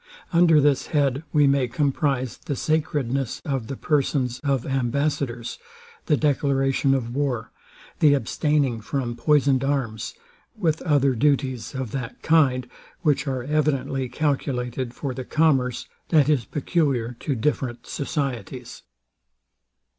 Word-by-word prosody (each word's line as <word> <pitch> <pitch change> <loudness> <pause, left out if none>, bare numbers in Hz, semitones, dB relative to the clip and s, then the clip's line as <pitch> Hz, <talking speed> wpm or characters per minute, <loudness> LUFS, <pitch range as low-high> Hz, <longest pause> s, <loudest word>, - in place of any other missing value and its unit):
Under 170 -2 +6
this 145 -2 +2
head 140 -3 +1
we 150 -2 +4
may 140 -2 +3
comprize 135 -1 0
the 145 - -4
sacredness 140 -5 -1
of 135 -6 -2
the 135 - -5
persons 135 -4 0
of 135 -4 0
ambassadors, 135 -2 -1 0.5
the 150 - +3
declaration 135 -1 +2
of 120 -3 -3
war, 135 -6 -1 0.5
the 145 -2 +6
abstaining 140 -1 0
from 120 +2 -3
poisoned 140 0 +3
arms, 130 -6 -2 0.4
with 160 -6 0
other 140 -4 +3
duties 130 -1 0
of 130 -4 -4
that 125 -2 -5
kind, 135 -6 +3 0.4
which 150 0 +2
are 130 -2 -2
evidently 135 -2 0
calculated 125 -3 -2
for 140 -3 -4
the 130 +1 -5
commerce, 135 -4 +1 0.2
that 150 -4 +4
is 140 -7 +2
peculiar 135 -6 0
to 140 - -2
different 120 -1 -2
societies. 130 - -4
135 Hz, 125 wpm, -24 LUFS, 125-145 Hz, 0.5 s, Under